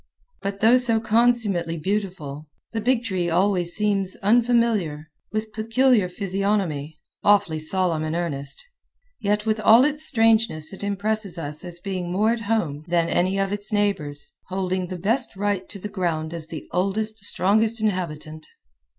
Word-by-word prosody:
But 195 0 -4
though 230 +3 +6
so 235 -3 +3
consummately 220 -7 +1
beautiful, 170 -5 -4 0.3
the 225 - -2
big 245 +1 +1
tree 185 -6 -1
always 175 0 +2
seems 200 -3 +2
unfamiliar, 215 -9 +1 0.2
with 215 0 -4
peculiar 225 -2 +2
physiognomy, 190 -6 -2 0.3
awfully 200 -6 +3
solemn 165 0 0
and 155 +1 -2
earnest; 145 - -2 0.5
yet 210 +1 0
with 215 0 0
all 225 +4 +6
its 300 +1 +1
strangeness 225 - +3
it 195 - -7
impresses 205 -1 -2
us 150 -2 -5
as 175 -1 -5
being 180 -2 -4
more 210 +5 +2
at 235 -1 -2
home 155 -10 -1
than 170 -1 +1
any 185 +2 +1
of 195 0 0
its 205 0 -5
neighbors, 180 -9 -1 0.2
holding 185 -1 -2
the 185 0 -6
best 225 +7 +2
right 200 -1 -2
to 205 - -8
the 200 - -6
ground 170 -5 -2
as 165 -2 -3
the 160 -2 -8
oldest 210 +4 -1
strongest 215 +4 +2
inhabitant. 155 -7 -3
195 Hz, 150 wpm, -23 LUFS, 170-220 Hz, 0.5 s, though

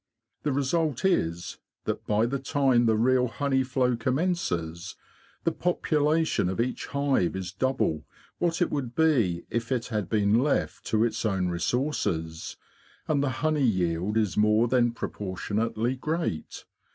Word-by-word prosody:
The 150 - 0
result 145 +2 0
is 85 - 0 0.3
that - - -3
by 105 +2 +3
the 135 +3 -2
time 135 -4 +2
the 110 - +4
real 125 +2 +3
honey 130 +4 0
flow 125 -1 +1
commences 105 - -2 0.5
the 165 - +2
population 160 - +1
of 95 - -4
each 125 +2 -1
hive 140 -10 +1
is 95 -1 -4
double 95 - -1 0.3
what 170 0 +1
it - - -2
would 130 -5 -3
be 120 - +2
if 115 +2 -2
it 125 -2 -1
had 105 -5 -2
been 105 0 +3
left 140 +3 0
to 110 -1 +2
its 115 - -1
own 95 -4 0
resources, 85 - -2 0.5
and 145 -3 +2
the 140 - +1 0.2
honey 155 -2 +2
yield 95 -3 +1
is 105 -4 +1
more 105 +2 +4
than 120 -1 +3
proportionately 110 +3 -2
great. 155 - -3
120 Hz, 145 wpm, -27 LUFS, 100-140 Hz, 0.5 s, the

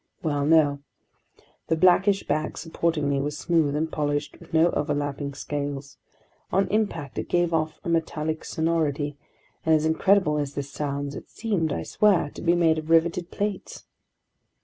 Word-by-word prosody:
Well, 145 -3 0
no. 150 -3 +4 0.9
The 160 - +2
blackish 185 +3 +4
back 155 0 -2
supporting 165 -2 -1
me 140 -1 +1
was 145 +1 -3
smooth 150 +1 +1
and 160 +1 -1
polished 145 -1 -2
with 170 - -16
no 165 +2 +4
overlapping 145 -1 -2
scales. 145 -1 -5 0.5
On 195 +2 +2
impact, 180 -10 -1
it - - -5
gave 175 -1 +1
off 155 -1 -1
a - - -7
metallic 160 -1 -1
sonority, 155 -3 -1 0.5
and 160 0 +4
as 155 0 +1
incredible 160 -1 +3
as 145 -1 -3
this 140 -1 -4
sounds, 140 -1 -3
it - - -9
seemed, 195 -9 -1
I 80 - -2
swear, 190 - +2
to - - -10
be 170 0 +3
made 165 -2 +3
of 155 0 -9
riveted 170 +1 +2
plates. 205 -1 -4
155 Hz, 160 wpm, -25 LUFS, 145-170 Hz, 0.9 s, no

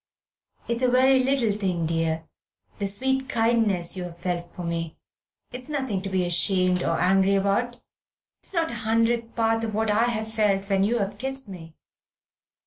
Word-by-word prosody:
It's 235 +1 -1
a 255 - +3
very 260 +1 +4
little 260 -4 +2
thing, 185 -5 -1
dear, 165 0 -1 0.5
the 200 - -1
sweet 265 +6 -1
kindness 225 -7 +1
you've 180 -2 -6
felt 175 -1 -3
for 180 - -7
me. 165 -1 -4 0.5
It's 250 +3 -8
nothing 265 -10 -2
to 195 - -4
be 185 -1 0
ashamed 180 +1 +2
or 165 -2 0
angry 190 +2 +3
about. 235 +5 0 0.6
It's - - -7
not 335 -3 0
a 235 -2 -5
hundredth 230 +1 0
part 225 0 +1
of 220 -2 -3
what 220 0 +1
I 220 +3 +3
have 220 -2 -3
felt 200 -3 +1
when 195 0 +3
you 230 +4 +1
have 200 -3 -3
kissed 270 -1 -3
me. 165 -4 -10
210 Hz, 170 wpm, -25 LUFS, 180-235 Hz, 0.6 s, very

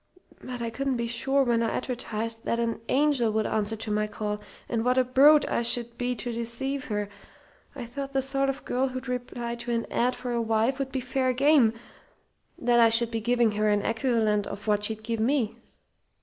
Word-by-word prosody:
But 250 -2 -6
I 230 - -3
couldn't 270 +2 -2
be 235 - -2
sure 270 +4 +1
when 235 -2 +1
I 230 - +1
advertised 230 -3 -4
what 235 - -1
an 230 -1 -2
angel 275 -5 +2
would 215 0 0
answer 215 +1 -1
to 220 0 -6
my 210 0 0
call, 210 0 -4 0.3
and 230 -2 -1
what 250 +1 +1
a 255 - +5
brute 280 +4 +5
I - - 0
should 235 0 +2
be 245 +1 -2
to 240 +1 -4
deceive 235 +4 -2
her. 210 -1 -2 0.7
I 255 -4 -6
thought 275 +3 -6
the 270 -1 0
sort 275 +1 0
of 275 - -5
girl 260 +2 0
who'd 255 0 -6
reply 245 -1 -4
to 235 +1 -6
an 230 -1 -1
'ad' 250 +2 +1
for 245 0 -5
a 235 -1 0
wife 225 +4 0
would 270 -1 -3
be 260 - -2
fair 255 0 0
game; 270 -3 +4 0.8
that 240 0 +2
I 230 -1 +6
should 230 +1 +5
be 225 -1 -2
giving 240 0 +2
her 210 0 0
an 205 -1 +1
equivalent 225 -3 0
for 210 +1 -2
what 205 0 +2
she'd 220 0 -3
give 230 0 -3
me. 230 -1 0
235 Hz, 210 wpm, -26 LUFS, 225-255 Hz, 0.8 s, I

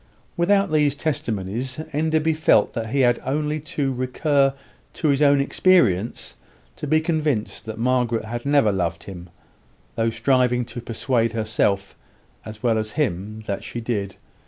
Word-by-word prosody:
Without 195 +1 +2
these 150 -2 +2
testimonies, 120 -3 -3
Enderby 155 +1 +1
felt 155 -9 +3
that 115 -1 -4
he 135 +3 +1
had 120 -2 +3
only 150 +2 -1
to 140 -2 -2
recur 135 +2 +1 0.4
to 155 - -1
his 140 0 +2
own 140 -1 +5
experience 130 - +2 0.4
to 150 - -5
be 155 +2 +3
convinced 155 -8 -1
that 110 0 -6
Margaret 120 -2 0
had 120 +2 -5
never 140 -6 +3
loved 85 -4 -2
him, 90 -2 -10 0.6
though 115 0 0
striving 125 +1 +1
to 120 0 -8
persuade 115 0 -1
herself, 105 -3 0 0.5
as 110 +1 -10
well 115 -2 +2
as 110 -1 -4
him, 110 - -2
that 100 -2 -3
she 120 - -6
did. 105 -5 -3
125 Hz, 150 wpm, -22 LUFS, 110-145 Hz, 0.6 s, own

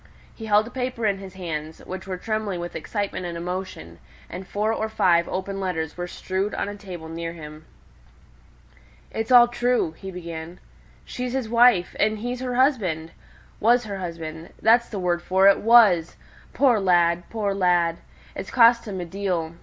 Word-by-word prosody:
He 225 - -9
held 210 0 +4
a 235 - -10
paper 250 -3 -3
in 200 -2 +1
his 190 -1 -10
hands, 160 -4 -5
which 190 0 -7
were 185 -1 -4
trembling 215 -2 -3
with 175 0 -6
excitement 200 +3 -3
and 170 -1 -5
emotion; 180 - -6 0.3
and 185 +1 -7
four 215 +2 -1
or 220 0 -2
five 170 -5 +2
open 195 +1 -4
letters 160 -5 -3
were 175 0 -4
strewed 190 +3 -3
on - - -2
a 205 - -6
table 180 -5 -9
near 165 +1 -5
him. 155 -1 -11 1.5
"It's 225 +3 -3
all 240 -1 +8
true," 245 -6 0
he 190 +4 -10
began; 170 -1 -8 0.5
"she's 250 0 -5
his 260 -4 -2
wife, 230 -5 +4
and 215 +1 +2
he's 245 +3 -4
her 250 -1 -3
husband 195 - +1 0.5
was 240 +3 +4
her 200 -3 -6
husband 165 -2 -7
that's 235 +2 +4
the 210 - -5
word 175 -2 0
for 190 +2 +3
it 200 - +6
was! 210 -8 +5 0.4
Poor 255 -6 +3
lad! 175 -2 +2
poor 210 -3 -1
lad! 175 -3 +2 0.4
it's - - -6
cost 235 -1 +5
him 195 -3 -4
a - - -4
deal. 175 -3 -3
190 Hz, 175 wpm, -24 LUFS, 170-220 Hz, 1.5 s, all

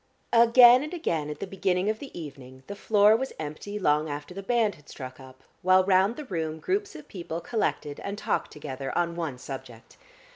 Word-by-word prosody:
Again 240 +1 +8
and 305 +5 -5
again 165 - -2
at 150 - -6
the - - -3
beginning 190 -1 0
of 215 0 0
the 280 - -8
evening 130 -4 -10
the 200 - -7
floor 210 +1 +4
was 265 +3 -3
empty 155 +7 -6
long 150 -5 +1
after 145 +3 -6
the 195 - -6
band 225 0 +1
had 145 -3 -19
struck 130 -1 -9
up, 130 -1 -14 0.2
while 185 +1 +5
round 190 +3 +3
the 300 - -7
room 160 -7 -3
groups 395 - -2
of 305 -2 -11
people 170 -3 -6
collected 170 -8 -2
and 200 +1 -5
talked - - -1
together 135 -2 -6
on 170 -1 0
one 160 -7 -3
subject. 125 -3 -10
180 Hz, 195 wpm, -27 LUFS, 145-220 Hz, 0.2 s, Again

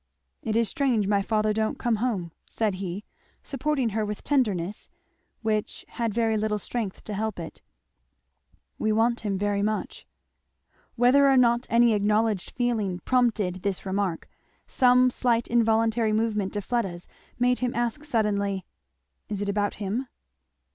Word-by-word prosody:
"It 220 -1 -2
is 230 0 +3
strange 240 -2 +1
my 200 0 +2
father 215 +1 +1
don't 220 0 -1
come 235 -2 0
home," 205 -8 -2 0.2
said 215 -3 0
he, 190 +2 -4 0.4
supporting 275 -2 -1
her 220 +1 -1
with 210 0 -5
tenderness 210 -9 0 0.5
which 215 -1 -2
had 230 -2 -2
very 225 0 +1
little 215 0 0
strength 210 -2 -4
to 215 - -6
help 220 +2 -2
it, 165 - -8 1.2
"we 215 - +1
want 230 +2 +2
him 205 -3 -2
very 205 0 0
much." 215 +1 -3 0.9
Whether 260 +4 +5
or 270 - +5
not 240 -1 +3
any 235 0 +5
unacknowledged 210 -1 +1
feeling 220 -7 -1
prompted 220 -8 +1
this 200 -1 -3
remark, 190 -3 -2 0.4
some 250 0 +4
slight 240 -2 +1
involuntary 225 -1 +2
movement 215 -3 0
of 205 - -3
Fleda's 195 -8 -2 0.3
made 250 0 +2
him 250 -1 -1
ask 240 +5 -1
suddenly, 200 - 0 0.6
"Is 205 -2 -3
it 205 0 -2
about 205 0 0
him?" 215 +6 -3
220 Hz, 145 wpm, -26 LUFS, 205-240 Hz, 1.2 s, Whether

